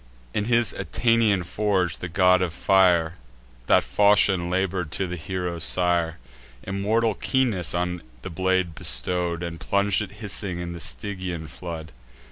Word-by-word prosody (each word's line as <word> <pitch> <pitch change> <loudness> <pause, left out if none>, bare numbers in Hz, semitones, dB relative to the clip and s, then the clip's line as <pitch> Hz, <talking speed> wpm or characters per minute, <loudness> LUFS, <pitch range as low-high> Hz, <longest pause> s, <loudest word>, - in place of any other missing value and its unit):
In 105 - -1
his 120 -3 +2
Aetnaean 115 -5 +1
forge, 95 -2 -1
the 90 - -5
God 90 +1 +4
of 90 -3 -1
Fire 90 -3 +3 0.5
That - - +4
falchion 100 -3 +3
labour'd 90 -3 -1
for 95 - -1
the 90 0 -5
hero's 90 +1 -3
sire; 85 -2 +2 0.5
Immortal 105 +4 0
keenness 110 -7 0
on 90 0 -2 0.2
the 95 - -6
blade 95 0 0
bestow'd, 85 +6 0
And 85 -1 -5
plung'd 100 +1 +1
it 105 - -6
hissing 100 -4 -1
in 85 0 -5
the 85 - -8
Stygian 90 0 -4
flood. 80 0 -8
90 Hz, 140 wpm, -24 LUFS, 85-100 Hz, 0.5 s, God